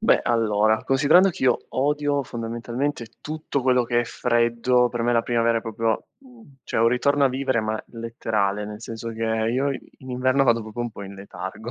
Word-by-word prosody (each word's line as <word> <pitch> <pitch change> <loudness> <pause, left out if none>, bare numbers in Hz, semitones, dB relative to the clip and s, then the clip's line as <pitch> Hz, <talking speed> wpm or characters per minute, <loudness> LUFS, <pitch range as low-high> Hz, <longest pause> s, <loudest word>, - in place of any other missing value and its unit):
Beh, 220 - +4
allora, 110 -2 +2
considerando 145 +8 +5
che 170 - -9
io 125 -2 +4
odio 145 +1 0
fondamentalmente 120 +2 -4
tutto 155 -2 -3
quello 125 -1 +3
che 120 0 +1
è - - -2
freddo, 120 +1 +2
per 120 -1 -3
me 120 +1 +2
la 115 -1 +3
primavera 115 -1 +1
è - - -7
proprio, 115 0 -2
mhmm 260 -2 -18 0.3
cioè - - -3
un 115 - +5
ritorno 140 +4 +2
a - - +5
vivere 130 -2 0
ma 110 0 -3
letterale, 110 -3 -2
nel 105 0 -8
senso 115 0 -6
che 115 0 -4
io 115 +5 0
i - - -6 0.2
in 130 - -10
inverno 130 +2 +2
vado 115 -2 +3
proprio 110 +2 -7
un 120 0 -2
po' 105 - -9
in 100 0 -8
letargo. 95 +3 -7
120 Hz, 200 wpm, -24 LUFS, 115-130 Hz, 0.3 s, considerando